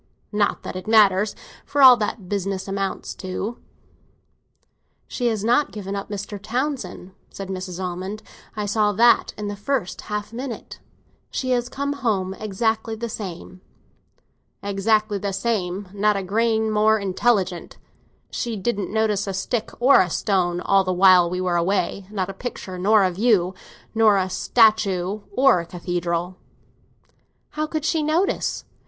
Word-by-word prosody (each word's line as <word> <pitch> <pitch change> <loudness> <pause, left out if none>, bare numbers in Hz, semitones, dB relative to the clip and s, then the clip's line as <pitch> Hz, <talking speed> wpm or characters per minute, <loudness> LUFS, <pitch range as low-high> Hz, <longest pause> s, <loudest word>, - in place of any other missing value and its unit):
Not 210 -1 0
that - - -6
it 185 +3 -7
matters, 210 -2 +4 0.3
for 285 -1 +1
all 255 -1 +11
that 210 0 -2
the 205 - -16
business 195 0 -3
amounts 195 0 -3
to." 195 +5 -5 1.5
"She 245 - -2
has 220 -3 -1
not 245 +6 +2
given 200 -2 -5
up 200 +1 -5
Mr. 205 0 -5
Townsend," 250 -4 -3 0.2
said 195 -1 -8
Mrs. 185 -1 -5
Almond. 185 +3 -5 0.3
"I 210 -1 -2
saw 210 0 +1
that 235 +4 +4
in 210 0 -4
the 205 - -4
first 205 -1 -2
half 210 +1 -5
minute. 245 0 -7 0.5
She 255 -1 -2
has 245 -1 0
come 280 +1 -2
home 210 -9 -1
exactly 220 +2 -2
the 235 +1 -5
same." 185 -3 -7 1.0
"Exactly 205 +1 +1
the 200 0 -3
same; 195 -3 -2
not 205 0 +2
a 195 - -3
grain 220 +2 +1
more 215 +1 +4
intelligent. 195 -2 0 0.5
She 235 -2 -3
didn't 200 -1 -2
notice 210 -2 0
a 195 - -3
stick 220 +4 -2
or 260 +3 +6
a 185 - 0
stone 175 -1 0
all 195 +1 +3
the 185 - -1
while 180 -1 +6
we 180 +1 -3
were 180 -1 +1
away—not 190 +2 -1
a 195 - -6
picture 190 -4 -6
nor 205 +2 +4
a 185 - +2
view, 190 -2 +2 0.4
not 220 -2 +5
a 185 -1 -1
statue 210 -3 +2 0.2
nor 265 -7 +5
a 170 - -5
cathedral." 175 0 -3 1.1
"How 305 0 -2
could 310 -1 -3
she 320 -1 +1
notice? 320 +6 0
205 Hz, 150 wpm, -23 LUFS, 185-225 Hz, 1.5 s, all